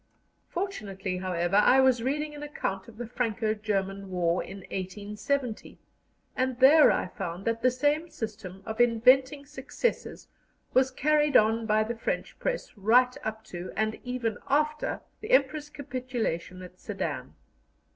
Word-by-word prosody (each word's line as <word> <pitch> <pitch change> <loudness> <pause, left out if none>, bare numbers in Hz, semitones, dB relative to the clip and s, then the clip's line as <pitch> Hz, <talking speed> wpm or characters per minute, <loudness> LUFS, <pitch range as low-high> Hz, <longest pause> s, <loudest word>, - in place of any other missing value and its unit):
Fortunately, 200 - -4
however, 180 0 0
I 250 +5 +6
was 260 -3 +4
reading 295 +4 -1
an 295 - -9
account 195 -10 -4
of 225 -2 -14
the 240 - -5
Franco 225 -2 -1
German 195 -2 -2
War 175 -1 +1
in 195 - -9
1870, 210 +6 -3 0.6
and 255 -1 -1
there 290 +4 +8
I - - 0
found 180 +1 -6
that 230 0 0
the 255 - +5
same 290 +6 0
system 205 - -7
of 220 +1 -1
inventing 255 +4 +4
successes 295 - -3 0.5
was 260 +1 +4
carried 295 +2 +3
on 225 +1 +2
by 215 0 +3
the 225 +2 -3
French 230 - -3
press - - -3
right 245 +5 +4
up 220 0 -4
to, 180 -4 -7
and 220 0 -1
even 245 -4 -2
after, 300 +2 0 0.2
the 430 - -8
Emperor's 310 -12 +2
capitulation 245 - -4
at 180 0 -13
Sedan. - - -4
230 Hz, 145 wpm, -28 LUFS, 200-275 Hz, 0.6 s, there